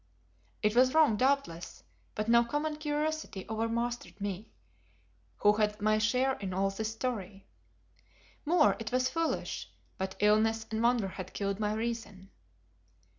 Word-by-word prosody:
It 210 Hz, +1 st, +2 dB
was 255 Hz, +3 st, +5 dB
wrong, 310 Hz, -8 st, +5 dB
doubtless, 255 Hz, -9 st, -1 dB, 0.3 s
but 215 Hz, +1 st, -2 dB
no 235 Hz, +1 st, +6 dB
common 295 Hz, +5 st, -2 dB
curiosity 305 Hz, -8 st, -2 dB
over 225 Hz, +1 st, -1 dB
mastered 235 Hz, -1 st, -3 dB
me, 200 Hz, +1 st, -4 dB, 0.9 s
who 210 Hz, 0 st, +5 dB
had 210 Hz, 0 st, 0 dB
my 215 Hz, +1 st, +2 dB
share 250 Hz, +5 st, +2 dB
in 190 Hz, -2 st, -4 dB
all 195 Hz, +1 st, +1 dB
this 220 Hz, +2 st, -3 dB
story. 215 Hz, -5 st, -4 dB, 1.0 s
More, 320 Hz, 0 st, +4 dB
it 220 Hz, -2 st, -5 dB
was 255 Hz, +1 st, +1 dB
foolish, 330 Hz, 0 st, -2 dB, 0.3 s
but 190 Hz, 0 st, -3 dB
illness 220 Hz, +2 st, +3 dB
and 220 Hz, 0 st, -1 dB
wonder 235 Hz, -3 st, +3 dB
had 185 Hz, -1 st, -8 dB
killed 200 Hz, 0 st, -2 dB
my 210 Hz, 0 st, 0 dB
reason. 220 Hz, -4 st, -4 dB
220 Hz, 140 wpm, -31 LUFS, 205-255 Hz, 1.0 s, no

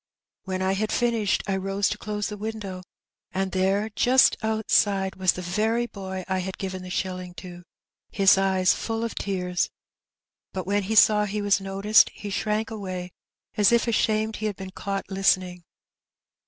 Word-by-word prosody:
* -, -, -67 dB
When 185 Hz, 0 st, -2 dB
I 190 Hz, -, +1 dB
had 210 Hz, +3 st, -1 dB
finished, 230 Hz, -4 st, +1 dB
I 195 Hz, -, -1 dB
rose 195 Hz, +1 st, 0 dB
to -, -, -3 dB
close 210 Hz, 0 st, -3 dB
the 210 Hz, -, -5 dB
window, 205 Hz, -3 st, -5 dB, 0.5 s
and 190 Hz, 0 st, -1 dB
there 195 Hz, +3 st, +1 dB
just 255 Hz, +4 st, +5 dB
outside 205 Hz, -3 st, +1 dB
was 185 Hz, -2 st, +2 dB
the 180 Hz, -, -6 dB
very 220 Hz, +6 st, 0 dB
boy 190 Hz, -4 st, -6 dB
I 190 Hz, -1 st, 0 dB
had 190 Hz, +1 st, -5 dB
given 185 Hz, -1 st, -5 dB
the 185 Hz, -, -8 dB
shilling 180 Hz, -1 st, -4 dB
to, 175 Hz, -1 st, -9 dB, 0.5 s
his 195 Hz, -2 st, +5 dB
eyes 190 Hz, -1 st, +3 dB
full 225 Hz, 0 st, -3 dB
of 230 Hz, -, -3 dB
tears; 180 Hz, -2 st, -2 dB, 0.8 s
but 185 Hz, -2 st, -4 dB
when 200 Hz, +2 st, +1 dB
he 220 Hz, -, 0 dB
saw 210 Hz, 0 st, +6 dB
he 210 Hz, +1 st, -3 dB
was 200 Hz, -1 st, +2 dB
noticed 195 Hz, +2 st, +4 dB
he 205 Hz, -, -7 dB
shrank 215 Hz, +2 st, -1 dB
away, 185 Hz, -4 st, -5 dB, 0.5 s
as 205 Hz, 0 st, +5 dB
if 235 Hz, 0 st, +3 dB
ashamed 220 Hz, -1 st, +1 dB
he 215 Hz, -, -2 dB
had 205 Hz, -, -3 dB
been 190 Hz, 0 st, -8 dB
caught 195 Hz, +1 st, -4 dB
listening. 185 Hz, -2 st, +1 dB
195 Hz, 175 wpm, -25 LUFS, 185-215 Hz, 0.8 s, saw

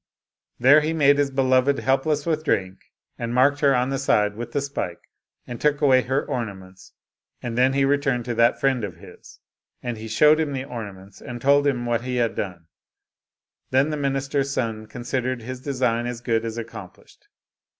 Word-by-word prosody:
There 135 Hz, +5 st, +6 dB
he 155 Hz, +2 st, -1 dB
made 145 Hz, -2 st, +4 dB
his 145 Hz, -1 st, +2 dB
beloved 135 Hz, 0 st, +2 dB
helpless 135 Hz, +5 st, 0 dB
with 155 Hz, -2 st, -1 dB
drink, 95 Hz, -10 st, -1 dB, 0.3 s
and 120 Hz, +1 st, -3 dB
marked 140 Hz, +3 st, +4 dB
her 140 Hz, -2 st, +4 dB
on 125 Hz, +2 st, 0 dB
the 135 Hz, -, -1 dB
side 105 Hz, -6 st, +2 dB
with 120 Hz, +2 st, -6 dB
the 145 Hz, -, 0 dB
spike, 140 Hz, -11 st, -4 dB, 0.4 s
and 120 Hz, -, -8 dB
took 150 Hz, -1 st, +2 dB
away 135 Hz, -3 st, +5 dB
her 130 Hz, +3 st, -1 dB
orna 115 Hz, -6 st, -3 dB
ments, 95 Hz, 0 st, -16 dB, 0.5 s
and 120 Hz, -2 st, -4 dB
then 130 Hz, +2 st, +3 dB
he 135 Hz, 0 st, +2 dB
returned 135 Hz, -4 st, +1 dB
to 120 Hz, -, -2 dB
that 115 Hz, +1 st, +3 dB
friend 130 Hz, -4 st, +1 dB
of 95 Hz, -5 st, -5 dB
his. 85 Hz, -, -15 dB, 0.4 s
And 120 Hz, -3 st, -4 dB
he 110 Hz, -, -7 dB
showed 150 Hz, +8 st, +4 dB
him 150 Hz, -3 st, -1 dB
the 130 Hz, 0 st, -4 dB
ornaments, 100 Hz, -7 st, -9 dB
and 120 Hz, -1 st, -7 dB
told 140 Hz, +3 st, +3 dB
him 125 Hz, -4 st, 0 dB
what 120 Hz, -1 st, 0 dB
he 125 Hz, +1 st, -4 dB
had 120 Hz, -2 st, +1 dB
done. 90 Hz, -4 st, -5 dB, 1.0 s
Then 135 Hz, +4 st, +2 dB
the -, -, -1 dB
minister's 135 Hz, -1 st, -1 dB
son 115 Hz, -5 st, -3 dB
considered 120 Hz, +1 st, -3 dB
his 130 Hz, +2 st, -7 dB
design 125 Hz, -4 st, -1 dB
as 120 Hz, -1 st, -5 dB
good 115 Hz, -2 st, -1 dB
as 115 Hz, 0 st, -5 dB
accomplished. 110 Hz, -5 st, -10 dB
125 Hz, 190 wpm, -23 LUFS, 115-140 Hz, 1.0 s, There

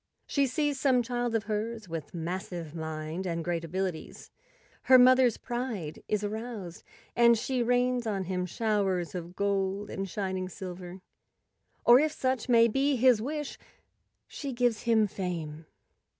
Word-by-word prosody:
She 280 Hz, -2 st, +1 dB
sees 290 Hz, +1 st, -1 dB
some 255 Hz, -3 st, +3 dB
child 240 Hz, -1 st, -2 dB
of 220 Hz, -, +1 dB
hers 220 Hz, +1 st, -3 dB
with 165 Hz, -3 st, -6 dB
massive 170 Hz, -1 st, -5 dB
mind 160 Hz, +2 st, -4 dB
and 165 Hz, -2 st, -3 dB
great 170 Hz, -1 st, -1 dB
abili¬ 185 Hz, +3 st, -1 dB, 0.2 s
ties; -, -, -14 dB, 0.5 s
her 260 Hz, -, +8 dB
mother's 255 Hz, -1 st, +6 dB
pride 240 Hz, -11 st, -4 dB
is 210 Hz, -1 st, 0 dB
aroused, 210 Hz, -4 st, -5 dB, 0.3 s
and 235 Hz, -1 st, +6 dB
she 255 Hz, +3 st, -1 dB
rains 245 Hz, 0 st, +1 dB
on 200 Hz, -3 st, -1 dB
him 180 Hz, 0 st, -2 dB
showers 195 Hz, -4 st, 0 dB
of 175 Hz, 0 st, -6 dB
gold 200 Hz, 0 st, -1 dB
and 195 Hz, 0 st, -4 dB
shining 185 Hz, -1 st, -3 dB
silver. 180 Hz, -1 st, -8 dB, 0.8 s
Or, 240 Hz, +2 st, +8 dB
if 305 Hz, +1 st, +1 dB
such 260 Hz, -4 st, -1 dB
may 230 Hz, -1 st, +6 dB
be 270 Hz, +5 st, +1 dB
his 250 Hz, -3 st, +4 dB
wish, 295 Hz, +3 st, -4 dB, 0.7 s
she 280 Hz, -3 st, -6 dB
gives 240 Hz, -2 st, +1 dB
him 220 Hz, -2 st, +5 dB
fame. 165 Hz, -6 st, -5 dB
210 Hz, 150 wpm, -29 LUFS, 180-245 Hz, 0.8 s, her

